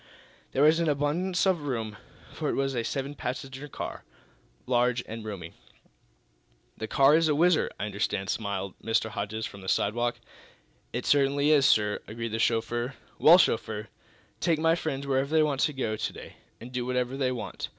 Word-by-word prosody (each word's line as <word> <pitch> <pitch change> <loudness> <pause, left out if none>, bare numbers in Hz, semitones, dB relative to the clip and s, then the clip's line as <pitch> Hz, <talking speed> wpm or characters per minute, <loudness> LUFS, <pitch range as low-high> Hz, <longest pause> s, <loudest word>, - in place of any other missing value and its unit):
There 135 - +3
was 155 +2 +5
an 165 -2 +1
abundance 155 +7 0
of 185 -4 +2
room, 110 -5 -3 0.4
for - - -2
it - - 0
was 135 0 0
a 120 -2 -1
seven 135 +3 -3
passenger 135 +1 -5
car, - - -6 0.6
large 125 0 +2
and 110 0 -6
roomy. 95 -6 -7 1.2
"This 110 - -6
car 140 +2 +5
is 165 0 +4
a 150 - +3
whizzer, 170 +1 +3
I 105 - -1
understand," 100 -1 -2
smiled 100 -3 -3
Mr. 115 -1 0
Hodges, 105 +2 -3
from 100 - -9
the 95 - -5
sidewalk. 120 +3 0 0.7
"It - - -3
certainly 140 +1 +3
is, 140 -3 +5
sir," 105 -4 +3
agreed 115 +1 -4
the 110 +1 -3
chauffeur. 120 +3 0 0.2
"Well, 170 +3 +8
chauffeur, 110 - 0 0.5
take 165 -2 +2
my 165 +1 +3
friends 140 -5 -3
wherever 135 0 0
they 160 0 +4
want 140 -3 0
to 150 - +3
go 115 -5 -2
to - - -3
day, - - -11 0.2
and 120 +2 -10
do 125 -1 -2
whatever 125 +1 -1
they 130 -2 0
want. 120 -5 -5
125 Hz, 180 wpm, -28 LUFS, 110-145 Hz, 1.2 s, Well